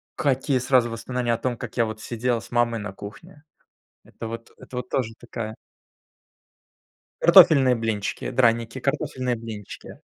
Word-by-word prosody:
какие 135 -1 +1
сразу 125 -1 +3
воспоминания 120 +1 -2
о 115 - 0
том, 125 -2 -2
как 125 -1 -8
я 115 - +4
вот 110 0 -6
сидел 120 +1 -1
с - - -13
мамой 120 -1 +1
на 105 -2 -6
кухне. 145 - -11 0.6
Это 115 - -8
вот, 115 +1 -7
это 125 - -10
вот 125 0 -4
тоже 115 -4 -1
такая 115 -2 -6 1.7
Картофельные 160 -8 +7
блинчики, 110 -3 -2
драники, 115 0 +2
картофельные 130 -2 -1
блинчики. 110 -3 -9
120 Hz, 140 wpm, -24 LUFS, 115-130 Hz, 1.7 s, Картофельные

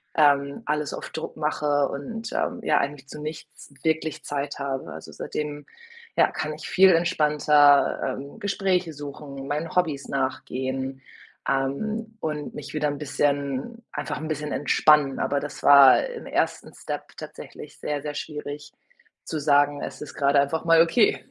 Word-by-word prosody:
ähm, 140 -2 +3
alles 150 0 -1
auf - - -6
Druck 160 - -6
mache 150 -2 +1
und, 225 +11 -6
ähm, - - -1
ja, 150 - +3
eigentlich 140 -1 -4
zu 150 - -8
nichts 155 -2 -9
wirklich 160 -1 -1
Zeit 145 0 -3
habe. 135 - -3
Also, 80 - -10
seitdem, 150 -1 -5 0.5
ja, - - +5
kann 155 0 -3
ich 155 - -8
viel 190 0 +6
entspannter, 150 -4 +4 0.2
ähm, 140 +9 -9
Gespräche 190 -5 0
suchen, 140 -1 -8
meinen 155 +4 -3
Hobbys 155 -6 0
nachgehen, 130 0 -3 0.5
ähm, 215 +12 -2
und 150 -2 -3
mich - - -8
wieder 150 -1 0
'n 145 - -4
bisschen, 145 - -1
einfach - - -4
'n 155 - -5
bisschen 150 -1 -3
entspannen, 145 -1 +3
aber 140 0 0
das 145 - -7
war 140 - +8
im - - -7
ersten - - -1
Step - - -6
tatsächlich - - -10
sehr, 145 -1 -2
sehr 150 0 -4
schwierig 150 -1 -6 0.5
zu 155 - -3
sagen: 145 0 +3
„Es - - -7
ist 150 - -7
grade 140 0 +3
einfach 140 +4 0
mal 165 0 +6
okay“. 185 +6 +3
145 Hz, 155 wpm, -25 LUFS, 140-155 Hz, 0.5 s, war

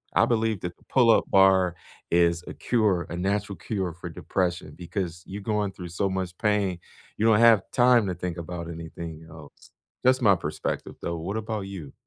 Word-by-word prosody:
I - - +5
believe 110 -4 0
that 90 -1 -5
the - - -26
pull 125 -3 +3
up - - +4
bar 95 -2 +5 0.4
is 85 0 +3
a - - -6
cure, 105 -7 +1
a 85 - -5
natural 100 +2 -1
cure 95 -2 -3
for 85 +1 -8
depression 90 -3 -2
because 85 -1 -4
you're 100 +2 -7
going 105 -1 -1
through 90 -1 -8
so 95 +3 -1
much 95 -2 -3
pain, 105 -5 +1 0.4
you 110 - +1
don't 110 -1 +5
have 115 -4 +6
time 120 -3 +5
to 90 - -1
think 90 0 -4
about 85 0 -6
anything 80 -1 -8
else. 80 -2 -14 0.3
That's 130 +1 +4
my 100 -4 +6
perspective, 75 -2 -4
though. 85 -1 -3
What 100 +7 -4
about 110 -1 -3
you? 95 -8 -8
95 Hz, 190 wpm, -26 LUFS, 85-105 Hz, 0.4 s, have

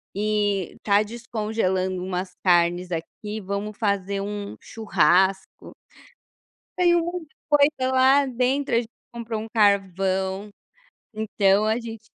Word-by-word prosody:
e 205 -3 0
tá 205 0 +3
descongelando 210 -5 -2
umas 180 0 -4
carnes 175 0 +3
aqui, 210 +6 -5
vamos 200 +2 -4
fazer 200 -2 -1
um 205 0 -5
churrasco". 190 -3 +1 1.1
Saiu 345 -1 +4
muita 345 -2 -6 0.2
coisa 285 -3 +3
lá 265 +2 +5
dentro, 255 0 0
a - - +5
gente 230 -2 -3 0.2
comprou 230 -2 -5
um 225 - -7
carvão, 195 -1 +1 0.7
então 210 -1 +2
a 220 +2 +1
gente 225 -2 -8
210 Hz, 115 wpm, -24 LUFS, 190-235 Hz, 1.1 s, lá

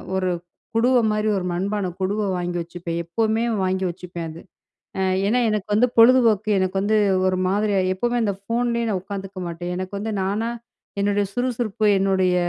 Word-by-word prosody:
ஒரு 185 -1 0 0.5
குடுவ 250 +3 +4
மாரி 210 0 0
ஒரு 180 - -3
மண்பான 195 +1 -1
குடுவ 205 +3 0 0.2
வாங்கி 175 0 -2
வச்சுப்பேன். 170 0 -5
எப்பமே 220 +5 0 0.2
வாங்கி 185 0 0
வச்சுப்பேன் 175 -1 -6
அது. 165 +2 -10 0.6
அ - - +1 0.3
ஏனா, 245 +4 +2
எனக்கு 210 -2 -2
வந்து 240 +4 +4
பொழுதுபோக்கு 230 -3 +5
எனக்கு 185 0 -1
வந்து 215 +2 +2 0.3
ஒரு 185 0 +1
மாதிரியா 200 +1 +1
எப்பவுமே 240 +5 -1
அந்த 200 - +1
ஃபோன் 235 +4 -1
லே 235 - 0
நான் 195 -3 0
உட்காந்துக்க 195 -1 -7
மாட்டேன். 175 +1 -5
எனக்கு 185 +2 -5
வந்து 220 +2 -3
நானா 210 +4 -1 0.5
என்னுடைய 205 0 +1
சுறுசுறுப்பு 240 -3 -1
என்னுடைய 190 -2 +2
200 Hz, 165 wpm, -22 LUFS, 185-220 Hz, 0.6 s, பொழுதுபோக்கு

